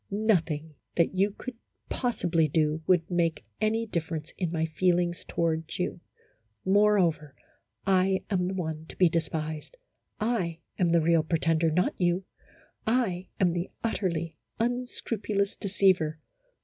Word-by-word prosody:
Nothing 170 -7 +1 0.2
that 170 +1 +3
you 195 +2 +3
could 245 +4 -8 0.3
possibly 170 -10 +1
do 155 +1 +1
would 175 -3 +4
make 170 -6 +1 0.2
any 225 +1 +1
difference 160 -5 -4
in 175 -4 -2
my 160 -1 0
feelings 175 +1 +1
toward 165 -1 -1
you; 180 -1 -2 0.7
moreover, 190 -8 +3 0.3
/ 110 -1 -44
am 190 0 +2
the 190 - -2
one 160 -3 -4
to - - -9
be 180 -2 +5
despised. 160 - -3 0.4
I 210 -7 0 0.2
am 180 -2 +3
the 170 0 +4
real 165 0 +4
pre 160 +2 0
tender, 165 0 +2
not 180 +4 +2
you! 175 +2 +2 0.6
I 215 -7 +1
am 180 -3 +3
the 175 +1 -2
utterly 170 -8 -1 0.2
unscrupulous 225 -4 -1
deceiver. 185 -6 +2
175 Hz, 135 wpm, -28 LUFS, 160-195 Hz, 0.7 s, be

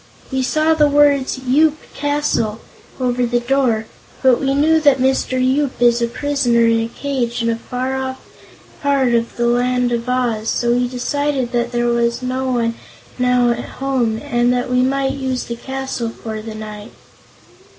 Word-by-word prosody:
"We 265 0 0
saw 310 +5 +2
the 300 -2 +4
words, 285 -2 +3
'Yoop 290 +4 +2 0.2
Castle,' 285 -7 -1 0.4
over 250 -1 0
the 240 0 +1
door, 240 -3 +1 0.4
but 260 -2 +4
we 275 0 +1
knew 315 +3 +4
that 285 -3 +5
Mr. 260 0 +1
Yoop 260 +2 +1
is 240 0 +4
a 235 - +2
prisoner 245 -2 +1
in 230 0 +3
a 225 - -2
cage 245 -2 -3
in 230 - +1
a - - 0
far 255 +3 -4
off 265 0 -4 0.6
part 275 -4 +2
of 235 0 0
the 240 - +1
land 245 +1 +1
of 235 +1 -2
Oz, 235 -3 0
so 240 0 +1
we 245 0 +1
decided 260 +1 -2
there 240 0 0
was 235 +1 0
no 260 +1 -2
one 230 -2 0 0.5
now 250 -1 +3
at 235 0 -3
home 255 -5 0
and 240 0 +1
that 250 0 -1
we 250 0 +3
might 270 +1 +1
use 260 -2 -2
the 235 - -5
castle 265 -1 -4
for 220 -1 -7
the 220 0 -8
night." 215 -1 -8
250 Hz, 170 wpm, -18 LUFS, 235-270 Hz, 0.6 s, that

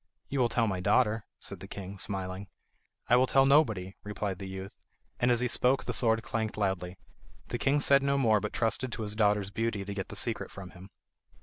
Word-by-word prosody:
"You 140 - -2
will 120 -2 +3
tell 115 0 +1
my 95 -4 -1
daughter," 110 +3 +2
said - - -6
the - - -9
king, 100 0 -8
smiling. 95 -1 -2 0.6
"I 120 - +5
will 130 +1 +4
tell 135 +1 +4
nobody," 110 -10 +3
replied 105 -2 -4
the 95 - -6
youth, 95 0 -7 0.5
and 120 - +2
as 120 -1 +3
he 125 - +1
spoke 125 +2 +2
the - - -2
sword 115 -1 +2
clanked 110 -2 -3
loudly. 95 -3 -2 0.5
The 120 - -3
king 140 +2 +2
said 140 -1 +5
no 140 0 +1
more, 110 -6 +3
but 105 +1 -4
trusted 120 +2 0
to 115 - -4
his 105 0 0
daughter's 105 -2 +2
beauty 110 -2 -2
to 100 - -5
get 95 -2 -4
the - - -8
secret - - -1
from 95 -2 -10
him. 95 +2 -13
105 Hz, 215 wpm, -29 LUFS, 95-120 Hz, 0.6 s, I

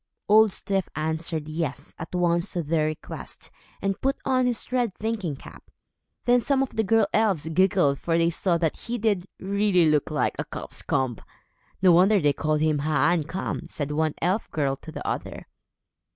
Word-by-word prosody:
Old 215 +1 +6
Styf 195 -1 -1
answered 160 0 -1
"yes" 155 +1 -4
at 160 +3 -6
once 175 +1 +1
to 175 - -1
their 155 0 +1
request, 155 -1 -7 0.3
and 195 -1 -1
put 270 +1 +1
on 255 -1 +2
his 240 0 -2
red 245 -6 0
thinking 210 -8 -3
cap. - - -14 0.6
Then 245 0 +4
some 270 +1 +2
of 270 - -4
the 220 - -1
girl 220 +1 +3
elves 195 -8 +2
giggled, 175 -5 +3
for 165 -1 0
they 170 0 +3
saw 170 +1 +1
that 165 -2 -1
he 240 +1 -4
did, 205 -5 0
really, 195 -3 +2
look 150 -1 +1
like 150 -1 0
a - - 0
cock's - - -5
comb. 125 -4 -1 0.7
"No 185 - +7
wonder 190 +5 +5
they 145 -4 +2
called 155 +1 0
him 155 -2 +2
Haan 155 +3 +2
e' - - -7
kam," 185 +5 -4
said 145 -1 -4
one 155 0 0
elf 185 +5 0
girl 140 -3 0
to - - -11
the - - -6
other. - - -4
175 Hz, 185 wpm, -25 LUFS, 155-210 Hz, 0.7 s, No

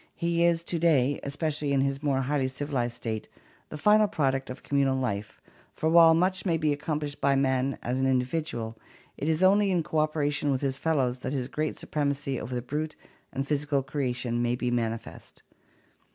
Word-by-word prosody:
He 170 0 +1
is 170 -1 +3
to 170 0 -2
day, 145 -5 +3
especially 145 0 -2
in 135 -1 +3
his 135 0 -1
more 140 -3 +1
highly 135 0 0
civilized 130 -3 -2
state, 110 -3 -5 0.4
the 155 - -6
final 210 +6 +5
product 135 -8 0
of 130 - -8
communal 140 -2 +1
life, 105 -6 -3 0.4
for 160 - 0
while 165 -1 +7
much 185 +2 +1
may 170 -4 +1
be 155 -2 +1
accomplished 150 0 -4
by 140 0 +3
man 135 0 +1
as 125 +2 -1
an 135 - +2
individual, 125 -3 -1 0.4
it 150 - -2
is 160 +3 +1
only 200 +2 +5
in 175 -3 +1
cooperation 155 -2 0
with 135 -2 0
his 135 -1 -1
fellows 130 -6 0
that 130 - -4
his 130 -3 -2
great 155 +3 -3
supremacy 140 -2 -2
over 125 +1 -5
the 120 - -3
brute 150 +4 -3 0.4
and 135 +1 -3
physi 150 0 -1
cal 140 -3 +2
creation 125 -3 -2
may 120 0 +1
be 125 0 -2
manifest. 115 -2 -4
140 Hz, 185 wpm, -27 LUFS, 130-155 Hz, 0.4 s, while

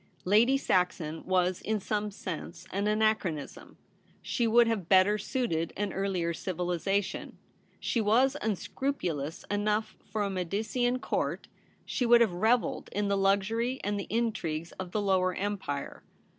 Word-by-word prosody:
Lady 225 +8 +5
Saxon 180 - 0
was 185 -1 +1
in 215 0 -1
some 210 +1 -2
sense 180 -3 -7
an 200 +2 0
anachronism; 210 -8 -1 0.4
she 235 -2 0
would 235 +1 +6
have 215 -7 -2
better 195 +2 +5
suited 195 - -1
an 205 -1 -2
earlier 185 -3 -1
civilization. 180 +3 -2 0.4
She 235 - 0
was 245 +6 +3
unscrupulous 180 - -2
enough 210 +1 0
for 210 +1 -2
a 200 - -1
Medicean 220 +7 0
Court; - - -2 0.4
she 245 - -1
would 235 0 +7
have 220 -6 +3
revelled 225 +7 +1
in 205 0 0
the 200 - +2
luxury 205 +6 +1
and 205 0 -1
the 200 - -5
intrigues 185 -9 -1
of 185 -1 -4
the 210 - 0
Lower 185 -2 +2
Empire. 190 -8 -3
200 Hz, 140 wpm, -29 LUFS, 180-220 Hz, 0.4 s, would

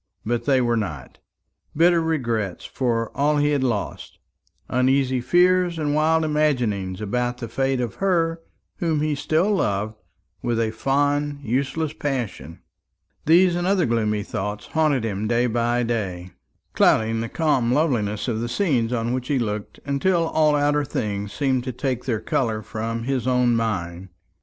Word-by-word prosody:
But 120 +1 -1
they 135 -2 +3
were 120 -1 +1
not. 75 -12 -5 0.6
Bitter 170 +1 +5
regrets 120 - -2
for 115 -3 -2
all 150 +2 +2
he 145 0 +2
had 140 -2 +1
lost, 115 -6 -3 0.5
uneasy 130 0 +2
fears 180 +5 +3
and 150 -2 -1
wild 160 +1 +2
imaginings 120 -11 0
about 125 +3 -1
the 120 - -6
fate 135 +3 0
of 120 -2 -2
her 165 -4 +1 0.4
whom 160 -3 0
he 155 0 0
still 155 +8 +1
loved 105 - -1 0.5
with 120 -1 -1
a 110 -1 0
fond 145 +4 0
useless 140 +5 -1
passion, 120 - -4 0.7
these 175 +3 +5
and 175 +1 -1
other 190 -3 +2
gloomy 105 -3 0
thoughts 105 +1 -4
haunted 155 -6 +1
him 105 -1 -2
day 120 +2 +2
by 120 +1 +1
day, 95 -6 -3 0.4
clouding 110 0 +3
the 115 - -4
calm 140 -7 +1
loveliness 120 -8 0
of 115 -2 -1
the 120 - -3
scenes 125 - +1
on 120 0 -1
which 125 -1 -3
he 145 - +1
looked, 105 -4 -3
until 165 +5 +1
all 155 -1 +3
outer 145 0 +2
things 105 -5 -3
seemed 130 -3 0
to 130 - -3
take 125 0 -3
their 115 -5 -1
colour 110 -3 -1
from 115 +2 -4
his 130 -1 -1
own 125 -2 +3
mind. 95 -5 -2
125 Hz, 155 wpm, -23 LUFS, 110-150 Hz, 0.7 s, Bitter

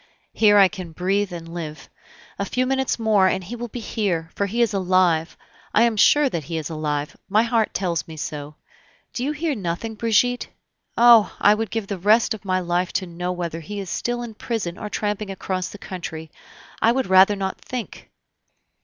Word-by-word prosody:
"Here 210 -2 +5
I 195 -1 +8
can 180 -2 -8
breathe 195 +3 0
and 165 -1 -8
live. 160 -3 -6 0.5
A - - 0
few 255 +1 0
minutes 265 0 0
more, 215 -4 +3
and 185 0 0
he 210 +7 -7
will 240 0 -5
be 240 - -7
here, 190 -7 -2
for 200 - -1
he 235 +4 +1
is 225 - 0
alive, 185 -3 +2 0.4
I 225 - +6
am 235 -2 +2
sure 290 +7 +5
that 170 - -3
he 165 +1 -4
is 155 0 -4
alive! 150 -1 -3
my 215 +3 +4
heart 230 -2 +1
tells 175 -4 -1
me 160 -1 -9
so. 150 0 -6 0.6
Do 245 - -3
you 285 - 0
hear 305 +1 -1
nothing, 200 +1 -3
Brigitte? 230 +3 +1 0.5
Oh! 235 -2 +6
I 205 - +6
would 220 0 -2
give 225 -2 -3
the 195 -1 -5
rest 215 +6 +4
of 215 - -9
my 185 -2 0
life 175 0 -1
to 185 - -1
know 180 +1 -4
whether 170 -2 -4
he 205 +5 -6
is 190 -3 -6
still 240 0 -2
in 235 -2 -7
prison 210 -6 -3
or 210 - -5
tramping 210 -1 -2
across 185 -2 -3
the - - -10
country. 160 -5 -7 0.5
I 225 - +5
would 260 +2 0
rather 190 +2 +6
not 190 -1 -4
think." 250 -3 -7
195 Hz, 200 wpm, -22 LUFS, 175-225 Hz, 0.6 s, I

